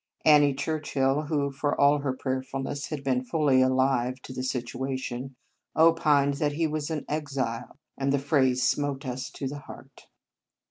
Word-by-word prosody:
Annie 145 -2 +6
Churchill, 140 -1 0
who, 145 -2 0
for 145 +1 -2
all 145 +1 +5
her 140 -2 -1
prayerfulness, 135 +2 -3
had 150 -3 -5
been 130 -2 0
fully 135 -1 +2
alive 130 -1 +2
to 130 - -8
the 130 - -4
situation, 130 +1 -4 0.4
opined 155 -4 +4
that 145 0 0
he 165 +3 0
was 155 -1 -2
an 155 -3 -3
" - - -38
exile," 130 -5 -4 0.2
and 135 0 +1
the 140 - +3
phrase 130 -3 +2
smote 145 -1 -1
us 130 0 -4
to 135 - -5
the 145 +2 -6
heart. - - -13
140 Hz, 160 wpm, -27 LUFS, 130-145 Hz, 0.4 s, Annie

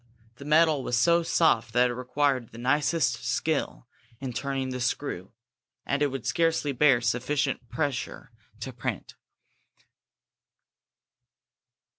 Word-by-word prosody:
The 140 - -10
metal 155 -1 +4
was 120 - 0
so 170 +7 +4
soft 155 -9 +2
that 125 +1 +3
it - - -3
required 125 0 0
the 115 - -13
nicest 145 +6 +1
skill - - -2 0.3
in 130 -2 -5
turning 135 0 -2
the 125 0 -4
screw, 120 -6 -3 0.5
as 140 +1 -1
it 145 - +3
would 135 -3 -6
scarcely 165 -3 +1
bear 135 -2 +4
sufficient 125 +2 -1
pressure 140 -7 -3 0.3
to 130 +2 -5
print. 120 - -5
135 Hz, 120 wpm, -27 LUFS, 125-150 Hz, 0.5 s, metal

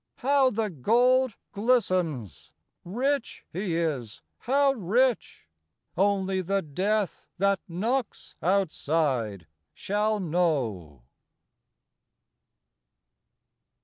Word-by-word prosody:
How 275 0 +3
the 220 -3 -2
gold 245 - +3 0.2
glistens! 185 - 0 0.3
Rich 255 +8 -2
he 180 -1 -2
is; 145 -10 -3 0.2
how 275 +2 +2
rich 240 - 0 0.5
Only 190 0 +1
the 195 +2 -1
death 195 +7 -1
that 200 +1 +2
knocks 220 +8 -3
outside 150 - 0 0.3
shall 210 +2 0
know. 130 - -1
195 Hz, 75 wpm, -27 LUFS, 160-230 Hz, 0.5 s, How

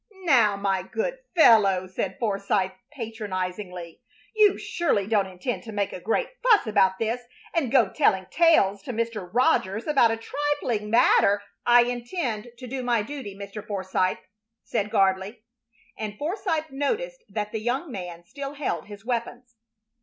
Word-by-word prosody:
"Now, 235 - +4
my 195 -1 0
good - - -3 0.2
fellow," 205 - +6
said 185 0 -4
Forsythe, 200 -3 0 0.2
patronizingly, 185 - -5 0.3
"you 420 -2 +5
surely 280 - 0
don't 205 -2 +1
intend 190 +7 -4
to 220 - -7
make 205 -2 -2
a - - -6
great 225 - 0
fuss 480 -4 +5
about 195 -3 +3
this 230 +3 -1 0.3
and 290 -9 0
go 245 -6 +5
telling 190 0 +2
tales 315 - +4
to 255 - -6
Mr. 225 -5 -3
Rogers 220 -3 +2
about 275 -6 +4
a 225 - -1
trifling 245 -4 -2
matter 205 -3 +4
" - - -53
"I 240 - +7
intend 240 - -3
to 255 - -9
do 260 +1 -4
my 240 -3 +1
duty, 255 -5 -7
Mr. 200 +1 -7
Forsythe," 190 -2 -1 0.5
said 210 0 -2
Gardley; 195 +2 +1 0.5
and 210 -1 -5
Forsythe 320 - -2
noticed 465 - -2
that 210 +1 -3
the 220 - -3
young 260 +7 -2
man 175 -5 -7
still 280 +5 -7
held 285 -7 -3
his 205 0 -11
weapons. 240 0 -4
225 Hz, 155 wpm, -25 LUFS, 195-270 Hz, 0.5 s, I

